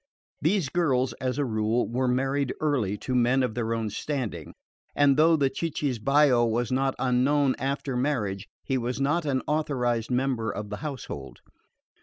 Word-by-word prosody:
These 165 -1 +1
girls 135 -6 +1
as 130 0 -1
a 145 - +1
rule, 110 0 0
were 125 +2 -1
married 135 +2 0
early 125 -10 0
to 130 - -4
men 125 +2 +3
of 125 - -1
their 115 -1 -2
own 115 -2 -1
standing, 130 0 -4 0.4
and 145 -1 +4
though 160 +3 +5
the 140 -3 +1
cicisbeo 140 -4 +2
was 115 +1 0
not 135 +1 +1
unknown 130 +2 +2
after 135 0 -2
marriage 120 -8 -1 0.2
he 135 -1 -1
was 125 +2 -3
not 150 +4 +1
an 135 -3 0
authorised 125 -7 0
member 125 -3 0
of 105 0 -5
the 105 - -3
household. 130 - -7
130 Hz, 160 wpm, -26 LUFS, 120-145 Hz, 0.4 s, though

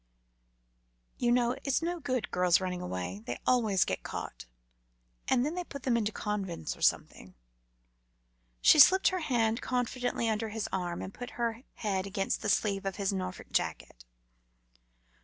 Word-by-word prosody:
"You 240 -1 +2
know, 245 0 +2
it's 275 +3 0
no 345 +1 -2
good 255 -6 -2
girls 180 -1 +4
running 180 -1 -3
away; 90 - -4
they 120 - -3
always 220 -7 +3
get - - -2
caught, - - -7 0.8
and 255 -1 +3
then 305 - -2
they 360 0 -3
put 280 -5 -9
them 255 -4 +2
into 220 -2 0
convents 200 - -3
or - - -17
something." - - 0 1.3
She - - +7
slipped 375 +8 +8
her 370 - -2
hand 235 -7 +1
confidingly 245 -1 -1
under 220 0 -1
his 215 -1 -3
arm, 175 -2 -2
and 190 - -7
put 245 0 -8
her 230 -1 -1
head 195 -3 -2
against 195 0 -2
the - - -1
sleeve 200 -1 +1
of 195 -1 -3
his 200 0 -1
Norfolk 185 -1 -5
jacket. - - -2
220 Hz, 160 wpm, -30 LUFS, 190-250 Hz, 1.3 s, slipped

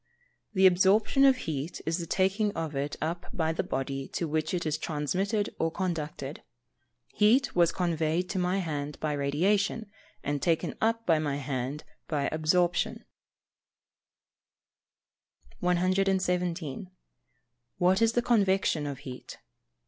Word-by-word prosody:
_ - - -51 0.5
The 190 0 +5
absorption 195 +8 +4
of 270 -1 +6
heat 155 - -4
is 165 +3 0
the 170 - -5
taking 195 +4 +1
of 160 -3 -4
it 140 +2 -2
up 170 +3 -3
by 160 -1 0
the - - 0
body 135 0 -3
to 170 - -1
which 155 0 -1
it 175 -2 -2
is 155 0 -1
transmitted 185 +8 -1
or 165 - +2
conducted. 155 -6 -4 0.7
Heat 230 +6 +3
was 170 -1 +4
conveyed 170 -1 0
to 190 - -1
my 180 +1 +1
hand 150 -5 -3
by 155 -1 -1
radiation, 195 +10 0 0.3
and 145 -1 -2
taken 165 -2 +1
up 230 +1 +1
by 165 -3 +3
my 145 -2 -1
hand 140 +1 -3 0.2
by 145 -3 0
absorption. 170 +3 +1 2.5
117. 180 -2 0 0.9
_What 185 +3 +3
is 230 0 +4
the 240 - +1
Convection 190 -9 +2
of 140 -2 -4
heat? 130 -2 -8
170 Hz, 135 wpm, -28 LUFS, 150-190 Hz, 2.5 s, of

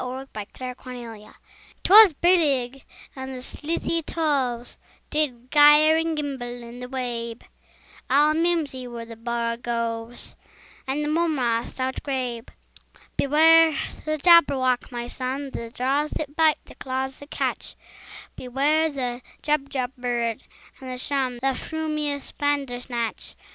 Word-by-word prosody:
Lewis 260 +2 -6
Carroll 250 +4 -6
Jabberwocky 235 -4 -9 0.5
'TWAS 415 -2 +9
brillig, 275 -7 +2 0.3
and 265 0 -6
the 250 - -8
slithy 330 +4 -2
toves 275 -7 -2 0.3
Did 255 -5 -1
gyre 295 +1 +7
and 325 -1 0
gimble 245 -5 -4
in 235 +1 -10
the 250 0 -7
wabe: 240 -3 -4 0.7
All 295 +3 +5
mimsy 315 -6 0
were 235 -1 -7
the 230 0 -10
borogoves, 230 0 -3 0.5
And 280 +3 -1
the - - -2
mome 320 0 +1
raths 235 -2 -1
outgrabe. 255 -2 -3 0.7
"Beware 320 +2 +5 0.3
the 310 0 -1
Jabberwock, 280 -7 +4
my 240 -1 -4
son! 265 +3 -4
The 230 -2 -6
jaws 270 +5 0
that 290 -1 -5
bite, 315 -1 +4
the - - -13
claws 265 0 -4
that 285 - -12
catch! - - -3 0.6
Beware 290 +5 +1
the 250 -4 -4 0.2
Jubjub 275 -4 -1
bird, 240 -2 -1 0.4
and 255 -2 -7
shun 265 -2 -1
The 270 0 +2
frumious 305 -1 -3
Bandersnatch!" 250 -5 -2
265 Hz, 120 wpm, -24 LUFS, 245-300 Hz, 0.7 s, TWAS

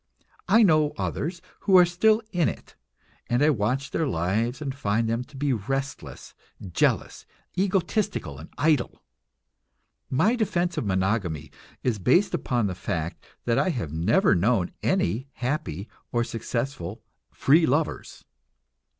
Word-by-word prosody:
I 225 - +6
know 155 -5 +4
others 170 +4 -3 0.2
who 195 -2 +5
are 180 - +8
still 215 +6 +3
in 175 -4 +2
it - - -10 0.5
and 120 +4 +2
I 155 - +5
watch 130 +4 -1
their 160 - 0
lives 110 - 0
and 140 -3 -3
find 115 -4 0
them 115 +2 -1
to 135 - -14
be 140 0 +1
restless, 135 +5 -4 0.4
jealous, - - 0 0.3
egotistical 185 - 0
and 80 - -11
idle. 150 -4 +1 1.1
My 180 - +3
defense 180 -6 0
of 110 - -2
monogamy 95 -6 -1 0.3
is 120 -5 0
based 175 - +3
upon 120 -3 0
the 95 - -1
fact 85 -3 -4 0.2
that 115 -1 +2
I 190 - +2
have 105 - -3
never 105 - +3
known 95 0 +2
any 115 +10 0
happy 120 - -3 0.2
or 120 -1 +1
successful 115 -4 -4 0.3
"free 160 +4 +4
lovers." 145 +4 -2
130 Hz, 135 wpm, -26 LUFS, 105-160 Hz, 1.1 s, are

